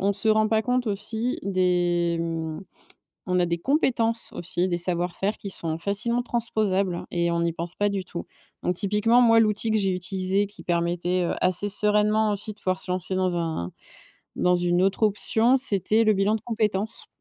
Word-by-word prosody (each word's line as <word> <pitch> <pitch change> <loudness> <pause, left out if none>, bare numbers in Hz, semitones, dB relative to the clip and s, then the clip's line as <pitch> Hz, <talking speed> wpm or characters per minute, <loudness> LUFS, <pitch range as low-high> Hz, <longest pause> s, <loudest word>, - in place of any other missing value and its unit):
on 200 +1 +2
se 220 +3 0
rend 215 0 +3
pas 220 0 +2
compte 250 +1 0
aussi 220 +4 -2
des, 175 -3 +1
mmh 165 -1 -4 0.7
on 180 - +2
a - - +3
des 170 0 -1
compétences 235 - 0
aussi, 175 +2 -2
des 175 -1 -1
savoir-faire 180 +3 -1
qui 200 - -7
sont 160 -3 -3
facilement 215 +7 -1
transposables 205 -6 -1
et 170 0 0
on 170 0 0
n'y 170 - 0
pense 170 +1 -5
pas 205 0 0
du 200 -1 -2
tout, 170 - -7 0.4
donc 180 - 0
typiquement, 210 +5 +3
moi, 230 -2 +5
l'outil 215 0 +2
que 220 - +2
j'ai 195 -2 +1
utilisé 190 +2 0
qui 205 - -13
permettait, 175 +1 0
heu, 170 - -1
assez 185 +3 +2
sereinement 210 +1 +2
aussi 210 +2 -3
de - - -19
pouvoir 185 -1 -1
se 185 - -6
lancer 185 +1 -2
dans 185 -1 0
un 160 - -3 0.6
dans 180 0 +2
une 175 0 +1
autre 195 +3 0
option, 220 +3 +3
c'était 220 -3 +2
le 215 -1 +4
bilan 200 +2 +1
de 215 - -5
compétence. 215 -3 -2
195 Hz, 190 wpm, -25 LUFS, 175-215 Hz, 0.7 s, moi